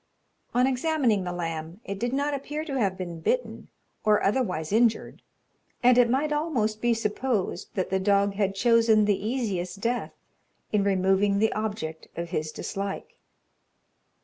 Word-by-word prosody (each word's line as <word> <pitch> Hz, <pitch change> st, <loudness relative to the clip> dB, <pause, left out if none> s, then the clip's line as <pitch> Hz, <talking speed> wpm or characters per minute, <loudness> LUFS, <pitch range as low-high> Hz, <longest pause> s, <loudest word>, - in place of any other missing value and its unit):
On 250 Hz, +1 st, +4 dB
examining 260 Hz, -, +1 dB
the 180 Hz, -, -2 dB
lamb, 165 Hz, 0 st, -4 dB
it 200 Hz, 0 st, -5 dB
did 240 Hz, +2 st, -1 dB
not 285 Hz, +2 st, 0 dB
appear 295 Hz, +3 st, -4 dB
to 275 Hz, -4 st, -2 dB
have 195 Hz, -4 st, 0 dB
been 175 Hz, -3 st, -5 dB
bitten, -, -, -2 dB, 0.4 s
or 210 Hz, -1 st, +3 dB
otherwise 195 Hz, -8 st, 0 dB
injured; 230 Hz, +1 st, +1 dB, 0.6 s
and 250 Hz, 0 st, +6 dB
it 245 Hz, -1 st, +5 dB
might 290 Hz, +4 st, +1 dB
almost 245 Hz, -9 st, -1 dB
be 240 Hz, -1 st, +2 dB
supposed 210 Hz, -3 st, -2 dB
that 185 Hz, -2 st, -2 dB
the 190 Hz, -, +2 dB
dog 200 Hz, +1 st, +2 dB
had 195 Hz, -1 st, 0 dB
chosen 230 Hz, -1 st, +4 dB
the 205 Hz, -1 st, +1 dB
easiest 205 Hz, -6 st, -2 dB
death 235 Hz, +3 st, -2 dB, 0.6 s
in 210 Hz, -2 st, +2 dB
removing 195 Hz, +1 st, +2 dB
the 220 Hz, +2 st, +2 dB
object 205 Hz, -8 st, -4 dB
of 170 Hz, 0 st, -4 dB
his 155 Hz, -3 st, -2 dB
dislike. 195 Hz, +4 st, -5 dB
210 Hz, 150 wpm, -26 LUFS, 190-245 Hz, 0.6 s, and